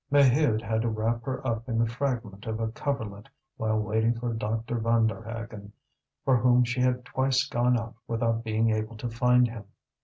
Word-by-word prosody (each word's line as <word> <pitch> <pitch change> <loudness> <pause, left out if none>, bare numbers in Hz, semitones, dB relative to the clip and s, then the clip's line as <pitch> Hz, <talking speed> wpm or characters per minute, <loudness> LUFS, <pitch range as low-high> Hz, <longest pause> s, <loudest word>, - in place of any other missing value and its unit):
Maheude 140 -4 +4
had 110 +1 0
to 115 - 0
wrap 115 +2 -1
her 130 0 -4
up 115 0 -2
in 115 - 0
the 115 - +3
fragment 115 -5 -3
of 110 0 -2
a 115 -1 -1
coverlet 110 -3 -4 0.3
while 110 -1 0
waiting 110 +2 +1
for 120 -1 -2
Dr. 115 +2 -2
Vanderhaghen, 115 -2 -1 0.5
for 130 -2 +4
whom 125 +1 +4
she 120 +1 -1
had 125 -1 +1
twice 130 +1 +1
gone 125 -1 +2
out 115 0 -5
without 115 0 0
being 110 0 +1
able 110 +1 -2
to 120 - -4
find 125 +1 +4
him. 115 -3 -8
115 Hz, 180 wpm, -27 LUFS, 110-125 Hz, 0.5 s, Maheude